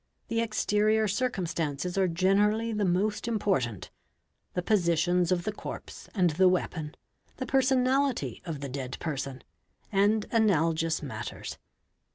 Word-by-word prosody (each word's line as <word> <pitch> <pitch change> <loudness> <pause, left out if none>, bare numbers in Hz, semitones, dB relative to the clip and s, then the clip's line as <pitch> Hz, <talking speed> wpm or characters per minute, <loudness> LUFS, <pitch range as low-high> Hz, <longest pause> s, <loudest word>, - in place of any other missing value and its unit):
The 230 0 +1
exterior 215 -1 +2
prcumetances 180 - -1
are 190 -1 +3
generally 205 +6 +2
the 210 -1 0
most 200 +5 0
important—the 180 - -3
positions 175 -2 +2
of 175 -1 +1
the 215 - -1
corpse 205 - -8
and 180 -4 +3
the 185 +4 +5
weapon, 165 -4 -2 0.4
the 260 - -3
personality 265 0 +1
of 160 -5 -5
the 140 - -4
dead 130 -1 -5
person, 135 -4 -4 0.5
and 205 +2 +3
analogous 165 -7 +2
Matters. 110 -6 -6
185 Hz, 120 wpm, -28 LUFS, 160-215 Hz, 0.5 s, the